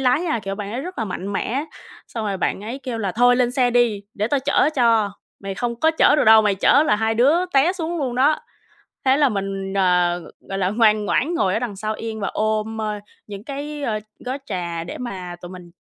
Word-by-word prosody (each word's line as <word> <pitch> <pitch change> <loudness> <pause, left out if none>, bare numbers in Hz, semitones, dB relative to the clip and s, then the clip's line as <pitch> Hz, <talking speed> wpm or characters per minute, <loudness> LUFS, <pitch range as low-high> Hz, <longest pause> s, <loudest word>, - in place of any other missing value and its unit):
lái 255 +3 +3
nha, 320 -8 -1
kiểu, 195 0 -3
bạn 205 0 -6
ấy 245 - -3
rất 360 +2 -7
là 225 - 0
mạnh 195 +1 -5
mẽ, 265 +8 -1 0.4
xong 225 -2 -4
rồi 195 - -1
bạn 190 - -1
ấy 245 +5 -5
kêu 245 -4 -4
là 195 -4 -2
"Thôi 245 +1 +4
lên 245 -1 +2
xe 250 -1 +2
đi, 235 -4 +2
để 210 +1 -1
tao 280 0 +1
chở 275 - +2
cho, 230 -5 +3 0.3
mày 195 -1 -5
không 235 +1 -3
có 320 - +4
chở 320 - +4
được - - +3
đâu, 220 0 +8
mày 205 -2 +2
chở 280 +9 +4
là 210 - +3
hai 220 +1 0
đứa 295 +10 +3
té 280 +6 +4
xuống 340 -2 -3
luôn 260 -4 -2
đó." 285 +5 +3 0.7
Thế 265 0 +4
là 290 -2 +4
mình, 195 -2 -3
ờ, 180 -2 +2 0.3
gọi 195 - -3
là, 185 -1 +1
ngoan 215 -1 +3
ngoãn 310 +11 0
ngồi 190 - +1
ở - - +1
đằng 230 -5 -4
sau 215 +2 -3
yên 220 -1 -5
và 200 - -1
ôm, 215 +1 -1
ơ, 215 -1 -1 0.3
những 205 0 -9
cái, 290 +2 -6
ờ, 220 -5 -1 0.3
gói 255 +2 -3
trà 170 -3 -4
để - - -7
mà 185 -8 -6
tụi 175 - -7
mình 180 -2 -11
225 Hz, 240 wpm, -21 LUFS, 195-260 Hz, 0.7 s, đâu